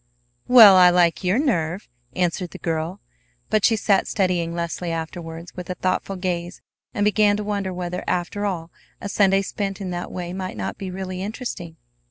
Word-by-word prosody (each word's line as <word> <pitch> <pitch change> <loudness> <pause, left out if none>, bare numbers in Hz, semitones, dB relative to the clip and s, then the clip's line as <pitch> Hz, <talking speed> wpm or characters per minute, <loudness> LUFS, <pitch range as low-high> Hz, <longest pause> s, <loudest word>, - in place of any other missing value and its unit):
"Well, 220 -6 +9
I 180 -1 +8
like 175 0 +2
your 185 +4 +2
nerve!" 190 - -1 0.3
answered 180 0 -1
the - - -10
girl; 165 +4 -3 0.5
but 215 -2 +2
she 230 - +5
sat 205 -2 +2
studying 180 -4 0
Leslie 170 0 -3
afterwards 165 +1 -6
with 180 0 -8
a 180 - -2
thoughtful 185 +2 -1
gaze, 180 -1 -3 0.3
and 205 -4 0
began 210 0 +3
to 210 - -3
wonder 200 -2 -2
whether, 180 0 -4
after 180 +3 -2
all, 175 -5 -3 0.3
a - - -5
Sunday 195 -1 +3
spent 195 0 -4
in 190 -2 -4
that 175 0 -5
way 175 -1 -5
might 185 0 -5
not - - -4
be 195 - -5
really 185 0 -5
interesting. 195 -6 -5
185 Hz, 180 wpm, -23 LUFS, 175-200 Hz, 0.5 s, Well